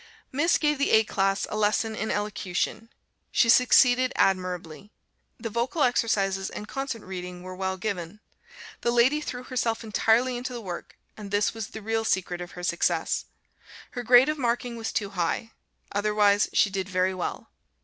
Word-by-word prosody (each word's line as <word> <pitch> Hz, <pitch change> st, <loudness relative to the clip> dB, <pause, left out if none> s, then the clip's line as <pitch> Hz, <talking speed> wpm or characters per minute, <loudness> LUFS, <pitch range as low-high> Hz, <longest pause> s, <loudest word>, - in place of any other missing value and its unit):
Miss 295 Hz, +6 st, +2 dB
gave 300 Hz, -2 st, +1 dB
the 280 Hz, -, +2 dB
A 220 Hz, 0 st, +7 dB
class 195 Hz, -2 st, 0 dB
a -, -, -2 dB
lesson 215 Hz, +1 st, +1 dB
in 220 Hz, +1 st, -3 dB
Elocution. 210 Hz, +1 st, -2 dB, 0.4 s
She 230 Hz, -, +3 dB
succeeded 250 Hz, +1 st, +5 dB
admirably. 180 Hz, -1 st, -1 dB, 0.5 s
The 225 Hz, -1 st, -5 dB
vocal 240 Hz, +8 st, 0 dB
exercises 195 Hz, -5 st, +1 dB
and 210 Hz, -, -7 dB
concert 270 Hz, -4 st, -4 dB
reading 180 Hz, -1 st, -7 dB
were 185 Hz, 0 st, -7 dB
well 190 Hz, 0 st, -2 dB
given. 185 Hz, -1 st, -4 dB, 0.6 s
The -, -, +1 dB
lady 245 Hz, +5 st, +3 dB
threw 250 Hz, -4 st, -5 dB
herself 240 Hz, -3 st, -2 dB
entirely 230 Hz, +3 st, +2 dB
into 250 Hz, +1 st, -5 dB
the 240 Hz, -, -5 dB
work, 180 Hz, -5 st, -7 dB, 0.2 s
and 210 Hz, -2 st, -9 dB
this 205 Hz, +1 st, +1 dB
was 225 Hz, -3 st, -5 dB
the 220 Hz, -, -9 dB
real 225 Hz, +1 st, 0 dB
secret 180 Hz, -4 st, -1 dB
of 175 Hz, -, -8 dB
her 180 Hz, -, -8 dB
success. 175 Hz, -1 st, 0 dB, 0.7 s
Her 245 Hz, -, -4 dB
grade 245 Hz, +2 st, +6 dB
of 305 Hz, 0 st, -1 dB
marking 240 Hz, -1 st, -1 dB
was 225 Hz, -1 st, -4 dB
too 205 Hz, -1 st, -2 dB
high; 185 Hz, +5 st, -2 dB, 0.4 s
otherwise, 205 Hz, 0 st, +2 dB
she 205 Hz, -, +3 dB
did 190 Hz, 0 st, -3 dB
very 185 Hz, 0 st, +1 dB
well. 185 Hz, -, -5 dB
215 Hz, 170 wpm, -26 LUFS, 190-240 Hz, 0.7 s, A